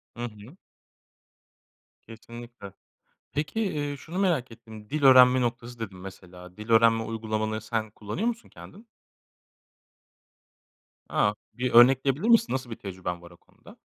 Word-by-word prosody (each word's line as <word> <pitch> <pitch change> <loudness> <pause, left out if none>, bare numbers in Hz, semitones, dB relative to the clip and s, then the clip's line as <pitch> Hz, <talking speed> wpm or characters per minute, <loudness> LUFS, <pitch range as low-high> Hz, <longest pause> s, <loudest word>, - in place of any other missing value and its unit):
Hı 120 - -6
hı. 110 - -11 1.5
Kesinlikle. 115 -2 -11 0.6
Peki, 155 +9 -3
eee, 145 -7 -2
şunu 165 +6 -7
merak 165 -11 0
ettim, 110 -2 -13
"dil 155 0 -3
öğrenme 130 -1 +7
noktası" 120 0 -4
dedin 100 -4 -7
mesela. 90 -1 -12
Dil 105 +2 -10
öğrenme 115 0 +4
uygulamalarını 110 -1 -3
sen 110 -2 -3
kullanıyor 110 - -4
musun 235 -1 -4
kendin? 220 +4 -14 2.2
A! 105 - +1 0.2
Bir 125 0 -2
örnekleyebilir 135 - +5
misin, 230 0 +4
nasıl 130 -1 -4
bir 115 - -6
tecrüben 90 -3 -6
var 85 - -14
o - - -17
konuda? - - -19
115 Hz, 130 wpm, -26 LUFS, 105-135 Hz, 2.2 s, öğrenme